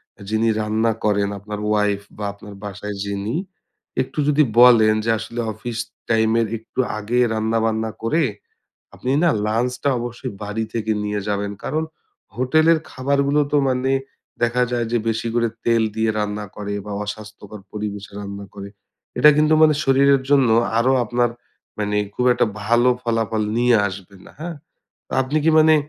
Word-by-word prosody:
অ্যা - - -13
যিনি 110 +1 +1
রান্না 110 +1 +1
করেন 100 -1 +2
আপনার 105 +1 -6
ওয়াইফ 105 -1 +1 0.2
বা, 105 - -4
আপনার 100 0 -12
বাসায় 105 0 -6
যিনি। 100 +4 -3 0.7
একটু 130 - -5
যদি 150 +1 +4 0.2
বলেন 115 -3 +7
যে - - 0
আসলে 115 +2 -6
অফিস 110 +2 -6 0.3
টাইমের 115 0 +2
একটু 110 +3 -10 0.2
আগে 110 +4 -1
রান্নাবান্না 110 0 0
করে, 155 +8 +2 0.7
আপনি 125 - -4
না 170 - +5 0.2
লাঞ্চটা 125 +5 0
অবশ্যই 120 -2 -5
বাড়ি 105 +2 -2
থেকে 110 -1 0
নিয়ে 105 0 -2
যাবেন। 100 0 -1
কারণ 155 +3 -1 0.5
হোটেলের 155 +6 +3
খাবারগুলো 140 +2 +1
তো 150 - +4
মানে 130 +1 0 0.5
দেখা 120 +1 +2
যায় 120 -1 0
যে 120 - +3
বেশি 115 +1 -1
করে 120 -1 +2 0.2
তেল 115 -1 +3
দিয়ে 110 0 +1
রান্না 105 0 -2
করে 100 0 -4
বা 105 - -5
অস্বাস্থ্যকর 105 0 -8
পরিবেশে 105 -1 -5
রান্না 100 0 -7
করে। 100 -1 -8 0.5
এটা 150 - +8
কিন্তু 155 +1 +4
মানে 155 -1 +6
শরীরের 135 0 +4
জন্য 135 -3 +5 0.3
আরও 125 +3 +3
আপনার 120 +1 +1 0.5
মানে 105 0 -1 0.2
খুব 125 - -1
একটা 120 - +2 0.2
ভালো 120 +3 +3
ফলাফল 115 -2 0
নিয়ে 120 0 +4
আসবে 95 0 -10
না, - - -14
হ্যাঁ? 170 0 -5 0.5
তা - - -11
আপনি 135 +4 0
কি - - +6
মানে 155 0 +6
115 Hz, 160 wpm, -21 LUFS, 105-125 Hz, 0.7 s, এটা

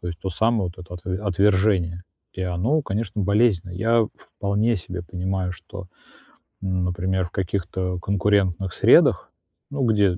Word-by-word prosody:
То 90 - -8
есть 85 -1 -5
то 95 - -3
самое 110 0 +1
вот - - -26
это 90 - -10
отв 90 +1 -11 0.2
отвержение, 95 -2 +2 0.3
и 95 - -5
оно, 95 - +1
конечно, 105 0 -3
болезненно. 100 -3 +2
Я 115 +3 +2
вполне 105 +3 -1
себе 90 0 -6
понимаю, 90 +1 -2
что, 95 +1 -10 0.7
ну, 95 -1 -1
например, 90 +1 -1
в 85 - -10
каких-то 90 -1 -2
конкурентных 95 -1 +1
средах, - - +5 0.4
ну 140 -2 -1
где 100 -5 +3
95 Hz, 145 wpm, -23 LUFS, 90-105 Hz, 0.7 s, средах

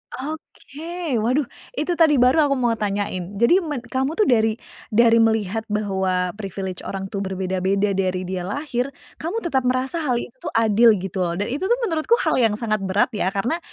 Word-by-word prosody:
Oke. 310 0 -5
Waduh, 255 +7 +1 0.3
itu 310 -1 -1
tadi 315 -3 +6
baru 270 +4 +4
aku 275 - +1
mau 240 -2 +1
tanyain. 200 -2 -3
Jadi 235 - +4
men 295 -8 -4
kamu 265 +5 -2
tuh 425 - +3
dari 225 - +3 0.3
dari 230 0 +4
melihat 220 -1 +1
bahwa 190 -4 0
privilege 190 -2 -5
orang 195 0 -5
tuh 200 - -3
berbeda-beda 190 +1 0
dari 185 -1 -1
dia 185 0 -4
lahir, 265 +1 -2 0.3
kamu 365 +9 -3
tetap 265 -7 0
merasa 255 +6 0
hal 270 -6 0
itu 235 - -4
tuh - - -5
adil 225 0 +5
gitu 190 0 -5
loh, 170 -1 0
dan 205 +5 -2
itu 285 +7 -3
tuh 475 - +4
menurutku 335 +3 +2
hal - - +2
yang 225 -4 +3
sangat 215 -1 -1
berat 200 +6 +2
ya. 205 -4 -1
Karena, 245 - 0
225 Hz, 185 wpm, -22 LUFS, 195-275 Hz, 0.3 s, tadi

